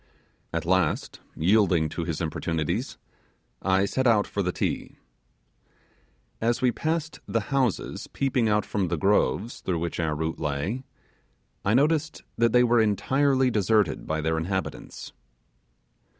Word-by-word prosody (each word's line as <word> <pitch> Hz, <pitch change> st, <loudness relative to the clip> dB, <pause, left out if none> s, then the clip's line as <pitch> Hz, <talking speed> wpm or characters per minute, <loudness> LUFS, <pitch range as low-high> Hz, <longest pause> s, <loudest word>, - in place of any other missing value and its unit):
At 85 Hz, -1 st, -2 dB
last, 90 Hz, -3 st, 0 dB, 0.2 s
yielding 90 Hz, -2 st, +3 dB
to 85 Hz, +2 st, -4 dB
his 85 Hz, -2 st, -3 dB
importunities, 80 Hz, -1 st, -2 dB, 0.6 s
I 95 Hz, +1 st, +2 dB
set 130 Hz, +6 st, 0 dB
out 110 Hz, -3 st, +4 dB
for 100 Hz, -, -3 dB
the 90 Hz, -1 st, 0 dB
Ti. -, -, -3 dB, 1.4 s
As 115 Hz, +1 st, +1 dB
we 125 Hz, -1 st, +3 dB
passed 160 Hz, +4 st, -2 dB
the 115 Hz, -, +1 dB
houses 130 Hz, -6 st, 0 dB
peeping 125 Hz, -4 st, 0 dB
out 105 Hz, -1 st, +2 dB
from 100 Hz, -3 st, -1 dB
the 85 Hz, 0 st, -1 dB
groves 105 Hz, +4 st, +1 dB
through 90 Hz, -3 st, -1 dB
which 85 Hz, +1 st, -3 dB
our 80 Hz, -2 st, 0 dB
route 80 Hz, +2 st, -3 dB
lay, 80 Hz, -, -2 dB, 0.8 s
I 105 Hz, +3 st, +2 dB
noticed 155 Hz, +3 st, +1 dB
that 115 Hz, 0 st, +3 dB
they 125 Hz, +1 st, +5 dB
were 120 Hz, -1 st, +4 dB
entirely 130 Hz, +5 st, +2 dB
deserted 105 Hz, 0 st, +1 dB
by 80 Hz, 0 st, -1 dB
their 80 Hz, +1 st, 0 dB
inhabitants. 95 Hz, +3 st, -4 dB
100 Hz, 135 wpm, -26 LUFS, 85-120 Hz, 1.4 s, they